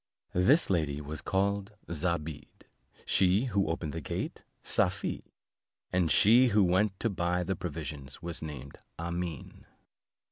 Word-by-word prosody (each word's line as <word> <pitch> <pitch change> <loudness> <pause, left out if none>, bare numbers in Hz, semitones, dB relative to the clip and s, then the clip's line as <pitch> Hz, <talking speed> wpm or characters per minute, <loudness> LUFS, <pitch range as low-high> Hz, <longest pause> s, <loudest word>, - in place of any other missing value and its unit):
This 115 - +4
lady 75 -5 0
was 75 +1 -6
called 100 +2 0
Zobeide, 80 -2 -3 0.4
she 95 +5 +3
who 100 -6 +1
opened 80 -2 -3
the 80 - -4
gate - - -4 0.2
Safie, - - -1 0.6
and 90 -3 +2
she 120 - +6
who 105 -3 +4
went 95 +2 +2
to 115 - +1
buy 90 -1 0
the 95 +2 -1
provisions 75 -5 -6
was 85 0 -4
named 70 -4 -8 0.2
Amene. 85 -2 -5
85 Hz, 130 wpm, -30 LUFS, 80-95 Hz, 0.6 s, she